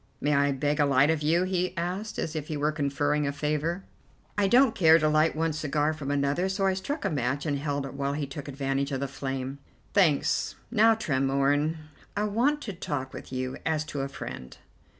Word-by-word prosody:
"May 150 +1 +1
I 140 0 +3
beg 145 +2 0
a 145 - +5
light 140 +2 +4
of 160 -2 -1
you?" 165 +4 +3
he 185 -1 -1
asked, 185 +6 -3
as 160 - -3
if 155 -1 -3
he 155 - -3
were 150 +1 +1
conferring 145 0 0
a - - 0
favour. 150 +5 -2 0.5
I 205 -1 +2
don't 245 +3 +5
care 160 -2 +6
to 155 -2 +2
light 155 +1 +3
one 160 0 0
cigar 150 0 0
from 150 -3 -6
another, 145 +6 +1
so 195 +1 0
I 190 - +3
struck 280 +11 -4
a - - +2
match 135 0 -1
and 145 -2 0
held 145 -1 -2
it 135 - -7
while 140 0 -2
he 145 0 -2
took 140 +1 -8
advantage 140 0 -2
of 135 - -1
the 140 - -2
flame. 135 0 -4 0.3
"Thanks. 165 -8 +2 0.2
Now, 225 -1 +5
Tremorne, 140 -2 +1 0.4
I 205 - +1
want 245 +8 +1
to 205 - -5
talk 145 -6 -4
with - - -9
you 130 0 -3
as 155 -1 0
to 140 - -2
a 135 - -2
friend. 65 - -8
150 Hz, 210 wpm, -27 LUFS, 140-170 Hz, 0.5 s, care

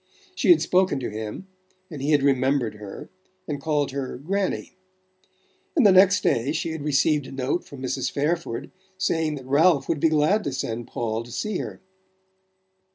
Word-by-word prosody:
She - - 0
had 350 - +7
spoken 185 -6 +2
to 120 - -4
him, 110 - -6 0.5
and 145 -4 -7
he 140 - -1
had 145 -3 +3
remembered 130 -4 +1
her 105 -2 -9 0.4
and 145 -2 -4
called 150 -2 0
her 135 -2 -4
"Granny"; 190 +8 -2 1.0
and 285 -8 +4
the 200 - +8
next 190 +2 +6
day 130 +6 +1
she 165 - -2
had 160 -1 -5
received 150 0 +1
a - - -10
note 135 +5 -2
from 135 -2 -10
Mrs. 130 0 -1
Fairford 145 -3 -2 0.3
saying 160 -4 0
that 135 -3 -9
Ralph 145 +3 +3
would 165 -3 0
be 160 - +3
glad 155 +8 +2
to 140 - -2
send 120 -2 -4
Paul 115 -2 -2
to 120 +1 -11
see 205 - -2
her. - - -6
145 Hz, 175 wpm, -24 LUFS, 130-165 Hz, 1.0 s, the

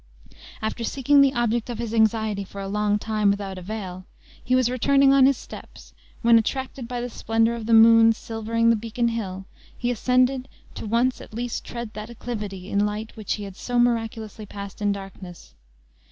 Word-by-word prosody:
After 220 +2 -2
seeking 280 +4 +3
the 275 -1 +4
object 240 0 0
of 240 - -4
his 230 -1 -4
anxiety 220 -2 +1
for 200 +1 -10
a 195 - -4
long 210 +1 +1
time, 215 -1 0
without 200 -2 -2
avail, 185 -1 -6 0.4
he 255 - +1
was 255 -2 +3
returning 275 +2 +4
on 270 -1 +6
his 275 -2 +2
steps, - - -12 0.3
when, 230 0 +7
attracted 260 +2 -4
by 245 0 -4
the 245 - -3
splendor 225 -1 0
of 230 -2 -6
the 230 - +2
moon 225 0 +7
silvering 230 +1 0
the - - +4
beacon 230 +2 -1
hill, 195 -5 -4 0.3
he 245 0 -1
ascended, 255 +2 +1 0.3
to - - -7
once 240 +4 +1
at - - -12
least 240 0 -3
tread 235 -2 -7
that 215 +1 -7
acclivity 210 -6 -6
in 200 0 +1
light 210 +2 -3
which 215 -3 -3
he 210 - -5
had 195 -2 -8
so 245 +4 -3
miraculously 225 -3 -1
passed 200 0 -8
in 205 -1 +2
darkness. 195 - -9
225 Hz, 185 wpm, -24 LUFS, 210-240 Hz, 0.4 s, when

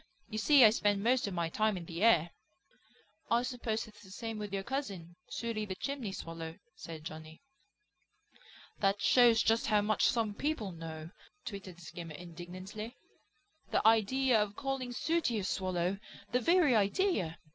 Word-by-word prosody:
You 215 -1 -3
see 275 +2 +7
I 215 - +8
spend 205 -2 +1
most 245 -1 +2
of 195 - -4
my 170 -1 0
time 215 +4 +1
in 170 - -7
the 170 +2 -6
air." 175 -7 +5 1.0
"I 235 +1 +3
suppose 240 -3 -2
it's 215 -2 -16
the 190 - -15
same 225 +2 -5
with 210 -1 -5
your 195 -1 -2
cousin; 195 - -4
Sooty 230 -2 -3
the 190 -3 -4
Chimney 265 -1 -4
Swallow," 165 -3 -7 0.2
said 160 -2 -9
Johnny. 160 - -9 1.4
"That 200 0 +2
shows 235 +1 +5
just 225 +1 +2
how 210 -2 +4
much 210 -2 +2
some 225 -4 +1
people 235 -5 -2
know!" 160 -1 -8 0.3
twittered 195 -4 -7
Skimmer 165 -1 -8
indignantly. 180 - -8 0.7
"The - - +2
idea 225 +2 +4
of 205 -1 -2
calling 270 -1 -3
Sooty 315 -2 0
a 205 - -2
Swallow! 185 0 -1 0.3
The 250 - +3
very 330 -1 +4
idea! 200 - +1
210 Hz, 155 wpm, -32 LUFS, 175-235 Hz, 1.4 s, I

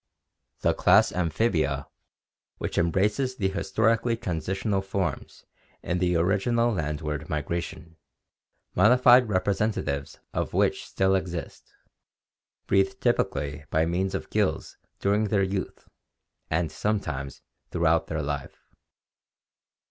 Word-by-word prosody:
The - - +3
class - - +4
Amphibia, 90 0 0 0.7
which - - -2
embraces 105 +10 +1
the 95 -5 0
historically 115 +4 +1
transitional 95 +2 -2
forms 95 -1 -4 0.4
in 90 +1 -1
the 90 -1 +1
original 105 +7 +2
landward 75 -2 -3
migration, 80 +1 -4 0.8
modified 125 +1 +6
representatives 95 -7 -1 0.2
of - - -2
which - - +1
still 95 0 +1
exist, 90 -3 -4 0.9
breathe 95 0 +2
typically 70 0 -1
by 80 +1 +2
means 90 +3 -1
of - - -5
gills - - 0 0.2
during 105 +2 +2
their 100 -1 +1
youth, 95 0 -4 0.6
and 80 0 0
sometimes 80 -8 -3 0.3
throughout 85 -1 +2
their 80 -2 -2
life. 70 -1 -5
95 Hz, 105 wpm, -26 LUFS, 80-105 Hz, 0.9 s, modified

